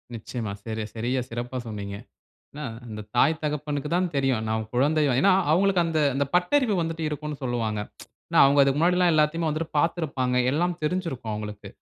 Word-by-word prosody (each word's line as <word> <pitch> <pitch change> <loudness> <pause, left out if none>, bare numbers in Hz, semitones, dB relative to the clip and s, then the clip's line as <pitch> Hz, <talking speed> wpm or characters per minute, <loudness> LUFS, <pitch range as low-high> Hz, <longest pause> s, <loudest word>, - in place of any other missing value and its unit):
நிச்சயமா. 110 -1 -5
சரி, 110 -1 -3
சரியா 125 +3 -1
சிறப்பா 120 +2 -4
சொன்னீங்க. 100 -2 -5 0.6
ஆனா 150 0 -6 0.2
அந்த 105 -1 -6
தாய், 160 +6 +3
தகப்பனுக்கு 150 -1 -2
தான் 180 0 +1
தெரியும். 135 -4 +1
நான் 110 0 -1
குழந்தை 150 +5 +2 0.2
ஏனா, 195 - +5 0.2
அவங்களுக்கு 185 +1 +3
அந்த 160 -2 0 0.2
அந்த 140 - +1
பட்டறிவு 215 +5 +3
வந்துட்டு 165 0 -3
இருக்குன்னு 150 -1 -5
சொல்வாங்க. 115 -4 -1 0.7
அவங்க 140 +1 +4
அதுக்கு 135 +1 +3
முன்னாடி 175 +2 +3
எல்லாம் 180 -1 +4
எல்லாத்தையுமே 155 +2 +2
வந்துட்டு 155 +2 -3
பார்த்திருப்பாங்க. 140 -7 0
எல்லாம் 175 +4 0
தெரிஞ்சிருக்கும் 150 - -2
அவங்களுக்கு. 105 -1 -6
145 Hz, 155 wpm, -25 LUFS, 120-165 Hz, 0.7 s, ஏனா